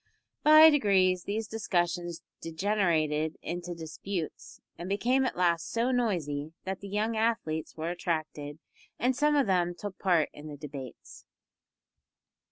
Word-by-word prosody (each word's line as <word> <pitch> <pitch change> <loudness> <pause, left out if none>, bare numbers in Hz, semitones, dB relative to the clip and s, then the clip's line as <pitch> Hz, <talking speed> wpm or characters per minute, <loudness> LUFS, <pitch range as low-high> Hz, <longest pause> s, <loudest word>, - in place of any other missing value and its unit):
By 310 +1 +9
degrees 190 - +3
these 215 +2 -2
discussions 175 -5 -1 0.2
degenerated 160 -4 0
into 175 0 -4
disputes, 165 +1 -6 0.2
and 175 +3 -7
became 245 +7 +2
at - - -2
last 170 -2 +1
so 235 +2 +1
noisy 165 - -1
that 190 0 -4
the 200 - -8
young 215 +3 -1
athletes 220 -10 -1
were 160 +2 -2
attracted, 155 -4 -3 0.4
and 250 +2 +1
some 295 +3 +2
of 285 - +3
them 175 -3 +1
took 205 -2 -7
part 175 -5 +2
in 150 +1 -10
the 145 -1 -8
debates. 140 -4 -9
180 Hz, 135 wpm, -29 LUFS, 160-220 Hz, 0.4 s, By